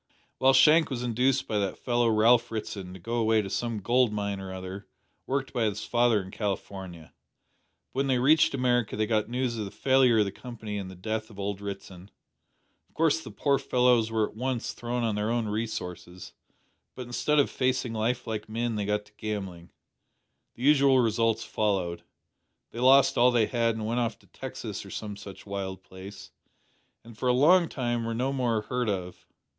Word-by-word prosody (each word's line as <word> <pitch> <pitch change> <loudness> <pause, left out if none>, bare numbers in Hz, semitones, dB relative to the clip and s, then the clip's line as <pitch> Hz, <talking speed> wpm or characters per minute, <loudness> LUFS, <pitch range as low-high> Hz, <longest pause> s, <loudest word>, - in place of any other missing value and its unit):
Well, 135 +1 +5
Shank 155 +4 +6
was 125 -3 -3
induced 125 +2 +1
by 105 - 0
that 100 -2 -2
fellow 120 -1 +1
Ralph 115 +2 +4
Ritson 105 -4 -5
to - - -10
go 115 +7 -3
away 110 -1 +3
to 95 - -7
some 115 -1 -2
gold 120 +2 +3
mine 100 -2 -3
or 95 -1 -7
other 95 +2 -7 0.4
worked 135 0 -2
by 120 -3 +1
his 105 -1 -2
father 120 -2 +3
in 95 - -11
California, 95 -5 -5 0.8
but 130 - -3
when 135 - +1
they 130 -2 +2
reached 140 +3 +4
America 120 -3 +1
they 110 - +1
got 110 -1 0
news 120 -1 -1
of 105 - -2
the - - -6
failure 130 +2 +3
of 105 - +4
the 100 - -3
Company 110 -2 -7
and 95 -2 -6
the 95 - -10
death 110 +4 -4
of 105 - -15
old 100 0 -3
Ritson. 95 -2 -8 0.8
Of - - -36
course 160 -1 +2
the 160 - -9
poor 140 -2 +1
fellows 125 -3 +3
were 110 -1 +1
at - - -16
once 125 +1 -2
thrown 120 0 -3
on 115 -2 0
their 105 +1 -1
own 115 -1 0
resources, 90 -5 -5 0.6
but, 125 - -6
instead 135 +5 0
of 145 - +3
facing 125 -2 0
life 120 +3 -1
like 110 -2 -5
men, 115 0 -2
they 100 -1 -2
took 105 0 -1
to - - -23
gambling. 95 -5 -5 0.9
The 120 - -8
usual 140 -2 +5
results 115 -2 +2
followed. 95 -5 -1 0.7
They 115 - -7
lost 135 +1 +5
all 125 +1 +6
they 120 -3 +3
had 115 -1 0
and 110 -1 -4
went 115 +3 -1
off 115 -3 -1
to - - -25
Texas - - -7
or - - -12
some 105 -2 -6
such 100 -1 -11
wild 95 -2 -5
place, 95 +2 -11 0.7
and 115 -1 -13
for 125 +4 -1
a - - +4
long 165 +7 +5
time 120 -3 -2
were 115 0 -3
no 130 +3 -1
more 120 -5 0
heard 125 +2 -2
of. 90 -3 -5
115 Hz, 195 wpm, -27 LUFS, 105-125 Hz, 0.9 s, Shank